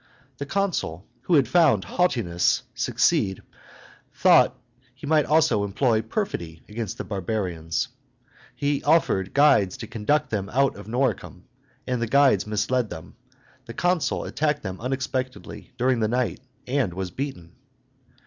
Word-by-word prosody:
The 140 - -4
consul, 150 - -2 0.2
who 175 - +3
had 135 -5 +4
found 135 - +4
haughtiness 100 - +1
succeed, 95 -1 +1 0.7
thought - - +4 0.4
he 135 - -10
might 150 0 +3
also 145 -9 +3
employ 110 +3 +1
perfidy 85 - -4
against 110 -2 -5
the - - -4
barbarians. 90 -5 -3 0.7
He 145 0 -1
offered 145 - +2
guides 140 -10 +4
to - - -7
conduct 120 +7 -1
them 100 -2 -2
out 135 +1 +2
of 100 0 -11
Noricum; 120 -2 -2 0.4
and 125 -2 -2
the 115 - 0
guides 135 -6 +4
misled 110 +3 0
them. 80 -2 -9 0.5
The 115 - -8
consul 175 -6 0
attacked 150 -1 -1
them 95 +1 -6
unexpectedly 130 +1 -4
during 125 0 +2
the 110 - +1
night, 125 +2 -1 0.3
and 125 -9 -1
was 95 -1 -4
beaten. 95 - -6
120 Hz, 135 wpm, -24 LUFS, 100-140 Hz, 0.7 s, had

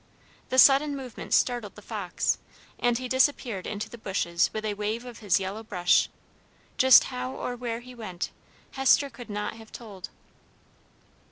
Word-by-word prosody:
The 260 - -1
sudden 280 +2 +6
movement 255 -3 -8
startled 240 -5 +1
the 210 - -12
fox, 200 -6 -2 0.4
and 240 -1 +2
he 255 +1 -4
disappeared 255 -6 +1
into 210 0 -4
the 235 - -11
bushes 170 -4 0
with 215 0 -4
a 210 - -1
wave 210 +4 -3
of 245 -2 -9
his 205 -3 +2
yellow 195 +3 -4
brush; 180 -5 +2 0.7
just 260 -1 +8
how 125 +1 -4
or 245 - -4
where 240 -1 -4
he 250 +1 -12
went, 215 -7 -5 0.4
Hester 270 +1 +3
could 240 -1 -11
not 210 +1 -4
have 220 -1 -14
told. 205 -6 -9
225 Hz, 160 wpm, -27 LUFS, 200-250 Hz, 0.7 s, just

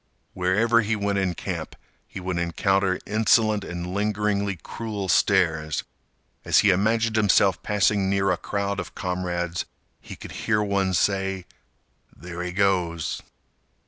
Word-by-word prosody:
Wherever 105 +6 +2
he 110 +1 0
went 100 -1 0
in 95 -2 -1
camp, - - -5 0.3
he - - -8
would 90 -1 -3
encounter 95 +2 +1
insolent 110 -1 +2
and 85 -1 -5
lingeringly 100 -1 0
cruel 105 -4 -5
stares. 80 -4 +2 0.6
As - - +4
he 105 - +5
imagined 110 +4 +1
himself 100 -3 +3
passing 100 -1 +1
near 100 -1 +2
a - - +2
crowd 100 -1 -2
of - - -7
comrades, 90 -1 -2 0.4
he - - -9
could - - -10
hear 105 -1 0
one 100 -2 0
say, 95 -1 0 0.7
"There 85 +3 -7
he 90 0 -3
goes!" 90 -4 0
95 Hz, 135 wpm, -24 LUFS, 90-105 Hz, 0.7 s, he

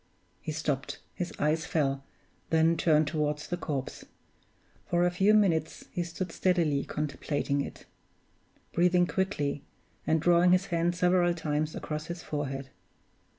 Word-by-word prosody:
He - - -4
stopped, 150 -4 -2 0.2
his 180 - -4
eyes 155 +2 +1
fell, 135 -3 0 0.5
then 160 +1 +4
turned 155 -1 +3
toward 150 -1 0
the 150 +4 -4
corpse. 145 -6 -4 0.8
For 175 0 +2
a 180 - +2
few 195 +4 +4
minutes 165 -7 +1
he 175 - -2
stood 170 +1 -5
steadily 165 -7 +1
contemplating 145 -1 -2
it; - - -7 0.9
breathing 180 +1 +4
quickly, 150 -5 -1 0.4
and 160 - +3
drawing 175 +2 +5
his 185 +1 +3
hand 170 +1 +1
several 180 -1 +3
times 155 -1 -1
across 155 0 -4
his 170 -1 -6
forehead. 135 -2 -4
160 Hz, 135 wpm, -29 LUFS, 150-175 Hz, 0.9 s, drawing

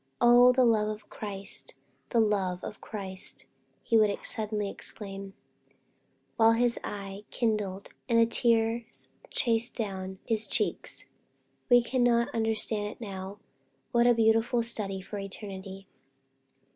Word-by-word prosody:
"Oh, 245 +1 +7
the 255 0 +4
love 215 -2 +3
of 215 0 -6
Christ! 195 -10 -5 0.3
the 235 - +2
love 195 -4 +1
of 210 - -7
Christ!" 195 -2 -6 0.4
he 230 - +3
would 210 -2 +2
suddenly 210 -1 -1
exclaim, 195 -1 -7 1.0
while 225 0 +6
his 235 +1 +1
eye 200 0 -6
kindled, 210 -5 -2 0.2
and 230 - +3
the 230 - +6
tears 230 0 0 0.2
chased 235 -1 0
each 225 - +1
other 200 - -6
down 190 0 -7
his 220 -2 -1
cheeks, - - -2 0.6
"we 245 -1 +6
cannot 240 -1 +2
understand 220 -2 +1
it - - -9
now 195 -2 -7 0.6
but 235 - +3
what 240 - +5
a 240 - +5
beautiful 225 +1 +3
study 200 -4 -4
for 205 +1 -6
eternity!" 195 -1 -7
215 Hz, 135 wpm, -29 LUFS, 195-230 Hz, 1.0 s, Oh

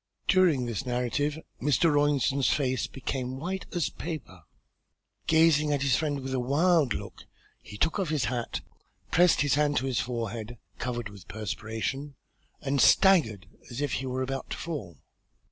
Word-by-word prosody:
During 175 -9 +4
this 115 0 -3
narrative 125 +4 -1 0.2
Mr. 150 +4 +3
Rawlinson's 145 -2 +2
face 130 -3 0
became 130 -1 -4
white 185 +6 -4
as 175 -2 -1
paper. 155 - -7 0.9
Gazing 160 -2 +4
at 140 -1 +1
his 135 -3 +3
friend 145 -2 -1
with 130 0 -4
a 130 - +1
wild 145 - +3
look, - - -8 0.3
he 105 - -10
took 165 - +1
off 185 -5 -1
his 150 -5 0
hat, 120 -2 -3 0.5
pressed 175 0 +5
his 145 -1 +2
hand 145 0 +2
to 130 - 0
his 130 -2 0
forehead, 115 -1 -4 0.2
covered 120 -3 -3
with 100 -4 -13
perspiration, 110 +7 -4 0.5
and 140 -2 +1
staggered 130 - +5 0.2
as 120 - -6
if 145 -2 -1
he 130 - -2
were 130 +1 -1
about 135 0 -4
to - - -4
fall. 140 - -6
135 Hz, 160 wpm, -28 LUFS, 120-150 Hz, 0.9 s, pressed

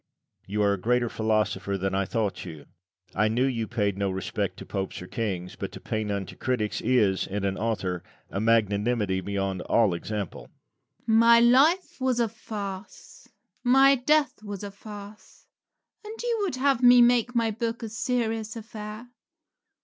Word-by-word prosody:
Lucian. - - -16
You 105 0 +1
are 100 0 +3
a 100 - -3
greater 120 +1 +1
philosopher 105 -3 0
than 95 0 -2
I 100 0 +1
thought 110 -1 -2
you. 80 -5 -9 0.5
I 105 +3 +2
knew 120 +4 +1
you 115 -4 -1
paid 100 -4 -1
no 100 -1 0
respect 95 0 -3
to - - -9
Popes 95 -1 -4
or 90 - -8
kings, 90 -4 -4
but - - -5
to - - -8
pay 110 0 -3
none 100 -2 -2
to - - -11
critics 120 -5 -2
is, 110 -6 +2
in 100 +1 -3
an 95 -1 0
author, 95 -6 -2 0.3
a 100 - -2
magnanimity 105 -2 +1
beyond 95 -1 -2
all 110 -2 +2
example. 95 - -5 0.6
Rabelais. 220 0 +3
My 235 0 +7
life 275 +8 +4
was 255 -2 +1
a 235 - +3
farce; 205 - -8 0.4
my 270 +2 +6
death 280 0 +1
was 205 -1 -6
a 200 - -6
farce; 205 0 -12 0.6
and 425 +1 -8 0.2
would 390 -9 -1
you 255 - -7
have 275 -3 +3
me 245 -1 +8
make 245 0 +3
my 230 -1 +2
book 230 +2 -3
a 225 - -4
serious 225 -1 -2
affair? 215 0 -8
120 Hz, 170 wpm, -26 LUFS, -, 0.6 s, me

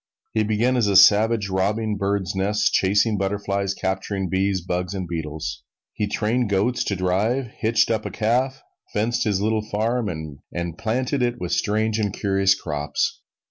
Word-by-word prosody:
He 110 - +2
began 110 +4 +1
as 115 -4 +2
a 100 - +1
savage, 105 +2 +6
robbing 105 +3 0
birds' 100 -2 -1
nests, 100 +2 +1
chasing 105 +2 +2
butterflies, 100 0 -1
capturing 95 0 -2
bees, 95 +1 +1
bugs 90 +2 -3
and 95 -2 -4
beetles. 80 -5 -4 0.3
He 105 - -1
trained 115 +3 0
goats 105 +5 +1
to 100 - -1
drive, 105 +7 0
hitched 115 +1 +2
up 110 -2 -1
a - - -4
calf, 125 +7 0 0.3
fenced 115 +3 0
his 100 -3 +1
little 110 +1 +1
farm, 110 +2 -1 0.4
and 85 -1 -4
planted 125 +4 -1
it 120 -1 0
with 90 -1 -4
strange 110 +1 +1
and 105 -2 0
curious 95 -1 +2
crops. 75 -2 -2
105 Hz, 160 wpm, -23 LUFS, 95-110 Hz, 0.4 s, savage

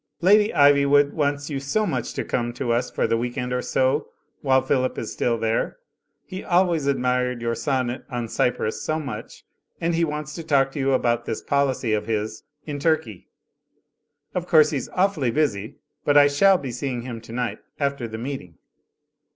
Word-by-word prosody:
"Lady 210 +4 +5
Ivywood 145 0 +5
wants 145 0 -1
you 140 - -2
so 140 +11 0
much 130 - -3
to - - -1
come 120 -1 -1
to 120 -1 -2
us 125 +2 0
for - - -1
the 115 - +1
week 120 +3 -3
end 125 -1 -2
or 125 - 0
so, 130 +4 +1 0.3
while 130 -2 +4
Philip 130 -1 0
is 110 - -4
still 115 -1 0
there. 115 0 -1 0.5
He 185 +1 -7
always 175 -5 +2
admired 125 -2 0
your 115 0 -1
sonnet 130 -1 -2
on 120 -2 -3
C)^rus 110 -1 -1
so 155 0 -1
much, 130 -8 -7 0.3
and 170 +1 0
he 165 +1 +1
wants 150 -2 -3
to 165 - -6
talk 135 -3 +2
to 145 - -6
you 135 0 +2
about 120 -2 +1
this - - -4
policy 135 -5 +1
of 105 0 -1
his 110 -1 -2 0.2
in 145 -2 -4
Turkey, 140 - -1 1.1
Of 180 -1 -3
course 155 -3 +5
he's 140 -5 -3
awfully 180 -9 +1
busy, 115 -7 -1 0.3
but 145 0 +3
I 145 - +8
shall 190 +7 +4
be 135 -6 -5
seeing 125 -1 -3
him 120 -3 -6
tonight 120 +2 -4 0.2
after 140 -4 -1
the 110 0 -6
meeting." 115 - -6
135 Hz, 185 wpm, -23 LUFS, 120-150 Hz, 1.1 s, I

